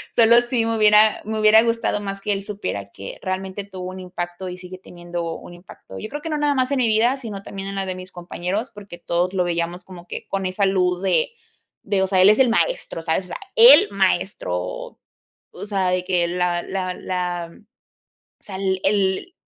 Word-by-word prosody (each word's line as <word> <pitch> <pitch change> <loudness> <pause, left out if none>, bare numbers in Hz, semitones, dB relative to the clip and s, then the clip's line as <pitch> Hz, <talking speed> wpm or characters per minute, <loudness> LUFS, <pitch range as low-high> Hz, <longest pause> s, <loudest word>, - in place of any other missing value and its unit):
Sólo 235 +1 +6
sí, 240 -1 0
me 225 0 0
hubiera 215 0 +5
me 220 0 -3
hubiera 215 +1 +7
gustado 230 -2 0
más, 195 -1 -5
que 210 - -2
él 195 0 -4
supiera, 100 - -5
que 100 - -9
realmente 190 +1 -4
tuvo 185 -2 -7
un 190 - -8
impacto, 180 0 -6
y 180 - -7
sigue 180 0 -10
teniendo 175 -2 -6
un - - -11
impacto. 175 +2 -12
Yo 215 - -5
creo, 295 +1 -6
que 325 - -5
no 305 - -1
nada 295 -1 +1
más 260 0 0
en 280 - +1
mi 245 - +3
vida, 225 +4 +3
sino 215 -7 -7
también 195 0 -7
en 195 - -6
la 195 0 -2
de 185 - -3
mis 185 0 -10
compañeros. 180 +6 -4
Porque 200 -4 -11
todos 175 +2 -1
lo 185 -2 +1
veíamos, 170 +1 -2
como 175 -2 -12
que - - -7
con 195 -1 -2
esa 185 +2 0
luz 180 -2 +1
de 475 - +2 0.6
de 200 -2 +1
O - - +1
sea, 185 -1 +3
él 190 - +8
es 215 - +4
el 265 - +6
maestro. 230 - -1
¿sabes? 165 +3 0
O - - -15
sea, - - -6 0.2
el 465 -3 +8
maestro. 190 - 0
O 90 +1 -6 0.6
o - - -7
sea, 195 -3 0
de 180 0 0
que 180 -2 +1
la 175 0 -1
la 185 -1 -3
la 175 -2 -3 0.9
o - - -40
sea, 195 - -8
el-el 195 - 0
190 Hz, 215 wpm, -22 LUFS, 180-215 Hz, 0.9 s, él